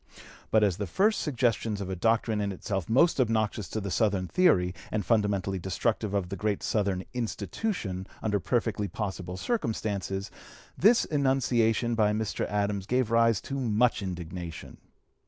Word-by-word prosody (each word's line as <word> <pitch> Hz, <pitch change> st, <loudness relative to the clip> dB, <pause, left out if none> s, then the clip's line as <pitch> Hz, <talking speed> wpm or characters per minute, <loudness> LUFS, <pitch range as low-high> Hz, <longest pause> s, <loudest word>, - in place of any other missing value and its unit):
But, 110 Hz, -1 st, +4 dB
as 95 Hz, -4 st, +2 dB
the 100 Hz, -, -3 dB
first 210 Hz, -, +2 dB
suggestions 120 Hz, -6 st, 0 dB
of 100 Hz, -, -4 dB
a 95 Hz, -, -3 dB
doctrine 110 Hz, +2 st, +1 dB
in 100 Hz, -1 st, -1 dB
itself 95 Hz, -2 st, -3 dB
most 135 Hz, +5 st, +4 dB
obnoxious 110 Hz, -3 st, 0 dB
to 110 Hz, -, -2 dB
the 100 Hz, -2 st, -4 dB
Southern 100 Hz, -4 st, +1 dB
theory 90 Hz, -, +3 dB, 0.2 s
and 105 Hz, -3 st, -1 dB
fundamentally 100 Hz, -4 st, +1 dB
destructive 100 Hz, +3 st, -1 dB
of 95 Hz, -3 st, -1 dB
the 100 Hz, -, -3 dB
great 105 Hz, +1 st, -1 dB
Southern 100 Hz, -4 st, 0 dB
"institution" 110 Hz, -, -3 dB, 0.2 s
under 105 Hz, -2 st, +1 dB
perfectly 110 Hz, +1 st, 0 dB
possible 95 Hz, -2 st, -5 dB
circumstances, 100 Hz, -, -2 dB, 0.4 s
this 225 Hz, +5 st, +5 dB
enunciation 125 Hz, -5 st, +1 dB
by 105 Hz, -2 st, +2 dB
Mr. 110 Hz, -1 st, -2 dB
Adams 100 Hz, -1 st, -1 dB
gave 125 Hz, -2 st, +1 dB
rise 115 Hz, -3 st, +4 dB
to 135 Hz, 0 st, -4 dB
much 120 Hz, -2 st, +2 dB
indignation. 90 Hz, -2 st, -6 dB
105 Hz, 150 wpm, -28 LUFS, 95-115 Hz, 0.4 s, this